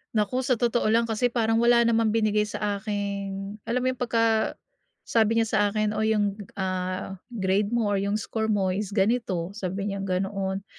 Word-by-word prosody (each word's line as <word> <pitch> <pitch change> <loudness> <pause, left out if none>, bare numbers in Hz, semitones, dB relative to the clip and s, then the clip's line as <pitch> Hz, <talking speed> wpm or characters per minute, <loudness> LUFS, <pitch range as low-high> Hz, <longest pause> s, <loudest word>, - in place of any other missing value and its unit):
Naku 215 +5 +1
sa 255 -1 +1
totoo 240 0 +1
lang 230 +2 +4
kasi 230 +2 +1
parang 225 -1 +1
wala 235 0 +5
namang 230 -1 +3
binigay 210 -1 +2
sa 205 -1 -2
akin. 200 -1 -4
Alam 250 +2 0
mo - - +1
yung 255 - -9
pagka 230 -2 +1 0.5
sabi 225 0 +2
niya 225 - +3
sa 220 -1 0
akin 215 0 0
o 215 - -3
yung 205 -1 +1 0.2
ah, 185 0 -3 0.2
"Grade 195 0 +1
mo 215 -3 +1
or 200 - +1
yung 200 +1 0
score 220 +1 -2
mo 195 -3 +1
is 200 +1 -3
ganito," 195 -4 0
sabi 195 0 -3
niyang 195 0 -4
ganoon. 190 +1 -2
210 Hz, 185 wpm, -26 LUFS, 195-225 Hz, 0.5 s, wala